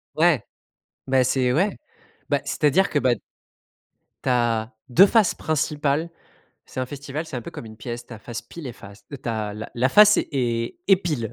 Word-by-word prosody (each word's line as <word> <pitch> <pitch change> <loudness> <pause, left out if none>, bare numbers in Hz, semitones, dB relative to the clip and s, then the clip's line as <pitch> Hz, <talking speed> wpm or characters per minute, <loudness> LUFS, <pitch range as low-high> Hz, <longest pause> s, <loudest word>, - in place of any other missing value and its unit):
Ouais, 155 -9 +3 0.6
bah, 130 -1 +3
c'est 130 0 +2
ouais. 190 +9 +1 0.5
Bah, - - +1
c'est-à-dire 160 +7 +2
que, 145 - +1
bah 130 -3 +3 1.1
tu 130 - 0
as 115 -2 +1 0.2
2 180 +11 +8
faces 215 -3 +3
principales. 150 0 0 0.6
c'est 130 - -5
un 130 - -2
festival, 145 +3 -6
c'est 130 - -6
un 120 - -4
peu - - -8
comme - - -8
une 110 - -11
pièce, 120 +1 -6
ta 115 -3 -10
face 115 +1 -7
pile 165 -5 -10
et 120 - -5
face. 100 -1 -14
Heu, 140 - -5
tu - - -6
as 105 -2 -2
la 110 - -7
la 125 +2 +2
face 210 +7 +7
et 120 -4 -1
et 195 - +8
pile, 150 -12 -3
130 Hz, 190 wpm, -23 LUFS, 120-155 Hz, 1.1 s, 2